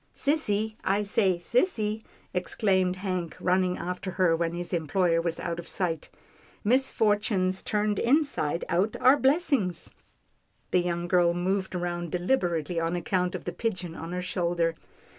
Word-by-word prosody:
" - - -37
Sissy, 220 -7 +1
I 200 +2 +1
say, 200 -2 +2
sissy," 220 - 0 0.3
exclaimed 185 0 +1
Hank 185 -3 -3
running 185 0 +1
after 180 +2 -4
her, 180 -3 +3
when 170 0 -1
his 175 +1 -5
employer 165 +1 +1
was 165 -1 -2
out 170 -1 -3
of 170 - -8
sight. 170 -4 -2 0.3
" - - -29
Misfortunes 210 -7 +2
turned 210 -1 0
inside 245 - +1
out 185 +5 +1
are 265 +3 +6
blessings." 265 - +1 0.8
The 180 - +4
young 175 0 -2
girl 175 -1 +3
moved 190 +1 -1
round 175 -2 -3
deliberately 175 - 0
on 165 +1 -1
account 180 +1 -1
of 185 - -5
the 175 - -4
pigeon 185 -4 -3
on 165 +1 -7
her 180 0 -3
shoulder. 170 -2 0
180 Hz, 150 wpm, -27 LUFS, 175-210 Hz, 0.8 s, are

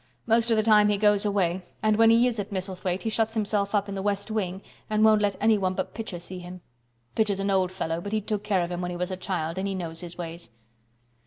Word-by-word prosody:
Most 230 +1 +3
of 225 - +3
the 215 - +3
time 210 -1 +5
he 205 - +2
goes 210 0 +3
away, 190 -3 +1 0.2
and 215 0 +3
when 225 +1 +6
he 230 +2 +5
is 240 -3 0
at 205 - -4
Misselthwaite 185 -1 -3
he 225 - 0
shuts 225 +1 0
himself 205 -1 0
up 205 0 +1
in 200 - -5
the 195 - -3
West 200 +1 -2
Wing 195 -3 -2 0.3
and 215 0 +3
won't 215 -1 +5
let 200 -2 +1
anyone 200 -4 +2
but - - -3
Pitcher 215 -6 -5
see 180 +2 -8
him. 180 0 -9 0.5
Pitcher's 210 -3 +1
an 195 0 0
old 185 -2 +2
fellow, 165 -3 -3
but 200 - -6
he 215 - +1
took 210 0 -3
care 200 -4 +1
of 175 - -4
him 175 0 -3
when 180 - -2
he 175 - -4
was 180 +1 -2
a - - -2
child 180 -2 -3
and 195 - -1
he 195 - -2
knows 165 -3 -4
his 175 -1 -8
ways." 170 -4 -6
200 Hz, 260 wpm, -26 LUFS, 180-215 Hz, 0.5 s, when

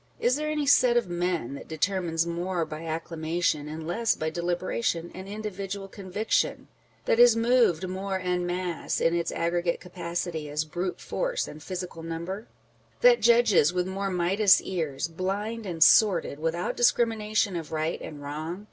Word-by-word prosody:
Is 245 +1 +2
there 305 +1 -2
any 300 -1 -1
set 250 -4 +5
of 235 - +1
men 175 -6 -2
that 140 - -9
determines 165 0 0
more 170 0 -2
by 155 +1 -7
acclamation, 160 -1 -1
and 155 +1 -6
less 225 +7 +1
by 155 0 -3
deliberation 175 +1 -2
and 190 +1 -8
individual 200 -1 -5
conviction? 200 +2 -1 0.4
â€" - - -34
that 225 - +2
is 240 -1 +8
moved 230 -7 +3
more 190 +1 -3
en 180 -1 -1
masse, 175 -1 -2
in 165 - +2
its 170 -1 -1
aggregate 170 0 0
capacity, 170 -3 -4
as 150 +1 -1
brute 175 +4 -4
force - - -2
and 155 - -10
physical 180 -1 -6
number? 170 +6 -5 0.5
â€" - - -34
that - - +6
judges 230 -9 +5
with 180 -1 0
more 195 +1 -3
Midas 190 +3 +4
ears, 160 -5 -3
blind 200 +6 -3
and 165 -3 +3
sordid, 175 -9 +4
without 165 +2 -2
discrimination 220 -4 +2
of 165 -3 -5
right 155 +1 -2
and 145 -2 -8
wrong 155 +5 -5
180 Hz, 165 wpm, -27 LUFS, 165-205 Hz, 0.5 s, is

